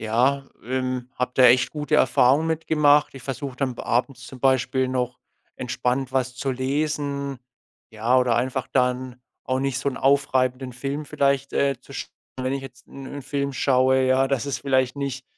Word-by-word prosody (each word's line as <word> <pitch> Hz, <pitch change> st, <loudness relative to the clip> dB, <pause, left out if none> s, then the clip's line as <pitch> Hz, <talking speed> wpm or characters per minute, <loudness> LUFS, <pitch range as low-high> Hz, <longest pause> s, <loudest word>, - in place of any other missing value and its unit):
Ja, 125 Hz, +5 st, +1 dB, 0.2 s
ähm, 130 Hz, 0 st, -2 dB
habe 125 Hz, 0 st, -2 dB
da 130 Hz, -, +5 dB
echt 125 Hz, +1 st, +5 dB
gute 150 Hz, 0 st, -2 dB
Erfahrungen 140 Hz, +3 st, +4 dB
mit 160 Hz, 0 st, -2 dB
gemacht. 150 Hz, -2 st, +4 dB
Ich 135 Hz, -, -10 dB
versuche 135 Hz, -1 st, -5 dB
dann 130 Hz, -3 st, -1 dB
b -, -, -7 dB
abends 125 Hz, +2 st, -1 dB
zum 130 Hz, -, -11 dB
Beispiel 130 Hz, 0 st, +2 dB
noch, 125 Hz, -1 st, -2 dB, 0.4 s
entspannt 130 Hz, +1 st, -2 dB
was 130 Hz, -1 st, 0 dB
zu 135 Hz, +1 st, -2 dB
lesen, 140 Hz, 0 st, -2 dB, 0.5 s
ja? 115 Hz, +3 st, +2 dB
Oder 125 Hz, -2 st, +2 dB
einfach 130 Hz, 0 st, -1 dB
dann 125 Hz, -1 st, 0 dB, 0.2 s
auch 130 Hz, 0 st, -1 dB
nicht 135 Hz, -1 st, -1 dB
so 140 Hz, -, -1 dB
'n 130 Hz, -, -4 dB
aufreibenden 130 Hz, -2 st, +1 dB
Film 140 Hz, +4 st, -4 dB
vielleicht, 140 Hz, -1 st, 0 dB
äh, 140 Hz, -3 st, +1 dB
zu 140 Hz, -, -14 dB
schauen. -, -, -6 dB, 0.3 s
Wenn 130 Hz, +1 st, -1 dB
ich 135 Hz, -, -2 dB
jetzt 130 Hz, -1 st, -12 dB
'n 135 Hz, -1 st, -10 dB
'n 140 Hz, +1 st, -7 dB
Film 140 Hz, +1 st, -2 dB
schaue, 130 Hz, 0 st, +3 dB
ja, 130 Hz, +1 st, +3 dB
dass 135 Hz, -1 st, 0 dB
es 140 Hz, -, -2 dB
vielleicht 130 Hz, -1 st, +1 dB
nicht 135 Hz, -2 st, -4 dB
130 Hz, 185 wpm, -24 LUFS, 125-140 Hz, 0.5 s, da